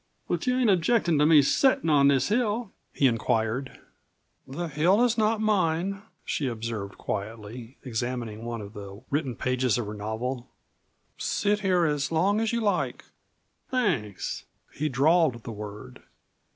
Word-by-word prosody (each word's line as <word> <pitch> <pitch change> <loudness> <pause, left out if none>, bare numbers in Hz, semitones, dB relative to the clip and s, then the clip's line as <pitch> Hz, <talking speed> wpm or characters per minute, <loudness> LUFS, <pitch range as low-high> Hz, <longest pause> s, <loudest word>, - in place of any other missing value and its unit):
But - - -2
you 250 0 +2
ain't 245 -5 +4
objectin' 175 -3 +2
to 150 - +5
me 155 -3 +7
settin' 260 - +3
on 145 -3 +5
this 135 +1 +3
hill?" 225 -1 0 0.2
he 140 - +1
inquired. 115 +1 0 0.7
"The 170 +6 -4
hill 170 - +3
is 240 -1 +3
not 220 0 +2
mine," 195 -2 +1 0.2
she 140 - -1
observed 110 -4 -4
quietly, 110 +4 -6
examining 120 -3 -3
one 115 -1 -4
of 100 0 -9
the 100 +2 -9
written 140 -4 -1
pages 125 -1 +1
of 120 - -2
her 105 - -5
novel; 120 +4 -4 0.7
"sit 205 0 +1
here 185 -4 +2
as 150 -1 0
long 195 +7 +2
as 225 - 0
you 235 0 0
like." 205 -4 -1 0.6
"Thanks." 165 - -1 0.3
He 155 +1 -1
drawled 140 -2 +3
the - - -6
word. 105 - -9
140 Hz, 150 wpm, -27 LUFS, 115-190 Hz, 0.7 s, me